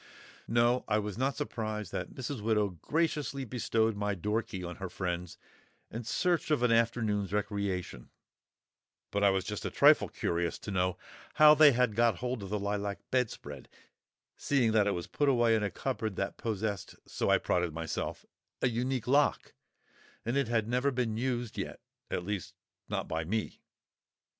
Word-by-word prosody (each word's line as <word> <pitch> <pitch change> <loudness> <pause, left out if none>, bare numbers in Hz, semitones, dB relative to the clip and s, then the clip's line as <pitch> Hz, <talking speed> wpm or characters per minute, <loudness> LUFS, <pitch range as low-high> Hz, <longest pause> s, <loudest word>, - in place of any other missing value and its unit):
No, 120 +2 +3
I 105 - +2
was 105 -2 -3
not 135 +4 0
surprised 110 - -4
that - - -5
Mrs. 130 -2 -4
Widow 105 -1 +2
graciously 145 - -1
bestowed 115 -2 0
my 105 0 -1
door 105 +5 0
key 95 -4 -7
on 90 0 -6
her 95 -1 -5
friends 90 -1 -4 0.5
in 115 +1 -5
search 175 +8 +1
of 150 -5 +2
an 120 - +4
afternoon's 115 -4 +1
recreation; 100 - -2 1.0
but 100 0 0
I 100 - +7
was 95 -1 +1
just 105 0 -4
a - - -2
trifle - - +5
curious 85 0 -1
to 100 - -7
know 90 -2 0 0.4
how 150 0 +9
they 150 -2 +7
had 125 -3 +2
got 120 -2 +4
hold 125 +2 -3
of 100 - -7
the 105 - -1
lilac 100 0 -2
bedspread, 125 -3 -2 0.7
seeing 130 -6 +2
that 105 -2 +3
it 100 - +1
was 85 - -4
put 145 -1 +1
away 120 -3 +4
in 110 - +1
a 100 - 0
cupboard 110 -3 -3
that - - -2
possessed—so 110 -3 -3
I - - +6
prided 90 -2 0
myself—a 80 +8 -4
unique 125 0 -1
lock; 140 +3 +2 0.7
and 120 +3 -1
it 140 -3 +2
had 110 -2 +1
never 125 +4 +1
been 120 -4 -1
used 120 -1 -2
yet—at 90 - -6
least, 100 -2 -4 0.3
not - - -2
by 80 0 -2
me! 105 +7 -3
110 Hz, 165 wpm, -31 LUFS, 100-125 Hz, 1.0 s, how